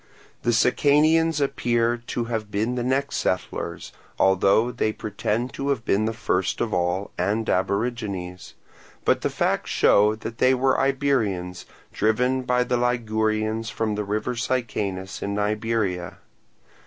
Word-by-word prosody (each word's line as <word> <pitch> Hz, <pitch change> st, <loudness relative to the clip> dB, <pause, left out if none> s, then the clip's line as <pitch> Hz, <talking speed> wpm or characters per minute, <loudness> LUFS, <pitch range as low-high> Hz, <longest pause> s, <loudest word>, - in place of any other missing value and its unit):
The 120 Hz, -, +1 dB
Sicanians 150 Hz, +6 st, +3 dB
appear 120 Hz, -4 st, +1 dB
to 120 Hz, -, -2 dB
have 110 Hz, -2 st, -3 dB
been 110 Hz, +4 st, -1 dB
the 125 Hz, -, -2 dB
next 135 Hz, +3 st, 0 dB
settlers, 95 Hz, -, -3 dB, 0.3 s
although 100 Hz, +5 st, +3 dB
they 110 Hz, -3 st, 0 dB
pretend 110 Hz, +4 st, -3 dB
to 140 Hz, +1 st, -3 dB
have 125 Hz, -5 st, -1 dB
been 105 Hz, +2 st, +2 dB
the 110 Hz, -, 0 dB
first 95 Hz, -5 st, -1 dB
of 115 Hz, -2 st, -1 dB
all 90 Hz, +3 st, -1 dB
and 105 Hz, +5 st, 0 dB
aborigines; 100 Hz, -3 st, -2 dB, 0.5 s
but -, -, +3 dB
the -, -, 0 dB
facts -, -, -1 dB
show 105 Hz, +1 st, +4 dB
that 110 Hz, +1 st, -8 dB
they 130 Hz, +1 st, +4 dB
were 130 Hz, +1 st, +2 dB
Iberians, 115 Hz, -11 st, 0 dB, 0.3 s
driven 125 Hz, +4 st, +1 dB
by 125 Hz, 0 st, +1 dB
the 125 Hz, 0 st, 0 dB
Ligurians 110 Hz, -2 st, 0 dB
from 115 Hz, -1 st, -2 dB
the 105 Hz, 0 st, -2 dB
river 105 Hz, +4 st, -2 dB
Sicanus 105 Hz, -6 st, -2 dB
in 100 Hz, 0 st, -2 dB
Iberia. 105 Hz, -4 st, -1 dB
110 Hz, 140 wpm, -24 LUFS, 100-125 Hz, 0.5 s, show